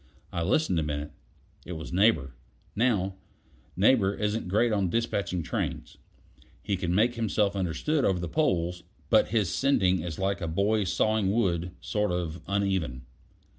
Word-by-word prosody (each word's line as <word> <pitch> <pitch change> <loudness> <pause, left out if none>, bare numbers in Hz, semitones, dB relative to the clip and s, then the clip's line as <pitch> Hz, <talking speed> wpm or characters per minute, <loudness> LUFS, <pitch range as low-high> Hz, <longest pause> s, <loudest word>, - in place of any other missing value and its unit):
I 85 - -1
listened 90 - +1
a - - +1
minute; 75 -1 -3 0.5
it 90 - -7
was 80 +1 -7
Neighbor. 90 - +3 0.4
Now, 100 -5 +1 0.6
Neighbor 100 0 +4
isn't 105 -1 -2
great 110 +6 +2
on 100 -4 +1
despatching 100 -5 -1
trains. - - -4 0.6
He 100 - 0
can 90 -2 -1
make 115 +5 +3
himself 105 -3 0
understood 100 - 0
over 95 - +2
the 85 -1 -3
poles, 90 - 0 0.3
but - - +5
his 105 -5 0
sending 95 - +2
is 80 -2 -5
like 95 -1 -1
a 85 - -2
boy's 100 +3 +1
sawing 110 -2 +1
wood 90 -5 0
sort 105 -2 -1
of 90 -1 -3
uneven. 95 -10 -1
95 Hz, 150 wpm, -28 LUFS, 85-105 Hz, 0.6 s, but